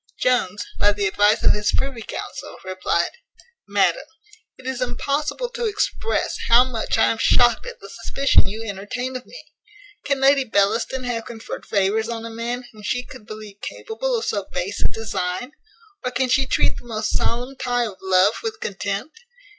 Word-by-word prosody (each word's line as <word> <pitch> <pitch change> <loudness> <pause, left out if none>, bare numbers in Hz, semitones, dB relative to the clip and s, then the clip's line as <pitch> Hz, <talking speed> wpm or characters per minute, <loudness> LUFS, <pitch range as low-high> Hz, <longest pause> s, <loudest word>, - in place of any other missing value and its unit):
Jones, 210 -6 +1
by 205 0 +5
the 205 -1 -1
advice 205 +2 +3
of - - +6
his 210 0 +1
privy 270 -4 -1
council, - - -6
replied: 185 -2 0 0.6
"MADAM, - - +2 0.5
"It 260 - -15
is 260 -1 -3
impossible 295 - -1
to 480 -1 -2
express 430 +2 0
how 235 +2 +8
much 245 -4 -1
I 225 - +5
am 225 - -3
shocked 240 - +4
at 480 - -8
the - - -10
suspicion 275 0 +2
you 220 +2 -4
entertain 225 +5 -4
of 255 - -6
me. - - -10 0.6
Can 280 -1 0
Lady 275 0 +5
Bellaston 225 +3 +1
have 235 -2 -2
conferred 230 0 -7
favours 210 +3 +2
on 230 -1 -4
a 230 - -6
man 235 +2 -3
whom 215 - -14
she 245 +4 -1
could 235 -5 -12
believe 215 -2 -9
capable - - -3
of 450 - -2
so 200 -2 -1
base 195 +3 -2
a - - +4
design? 220 +2 -3 0.5
or 250 - 0
can 250 +1 0
she 265 +1 +3
treat - - +2
the - - -10
most 215 -2 -1
solemn 245 +3 0
tie 245 -2 0
of 205 -4 -6
love 190 +3 +4
with 445 -1 -4
contempt? 200 - -3
235 Hz, 180 wpm, -23 LUFS, 205-260 Hz, 0.6 s, how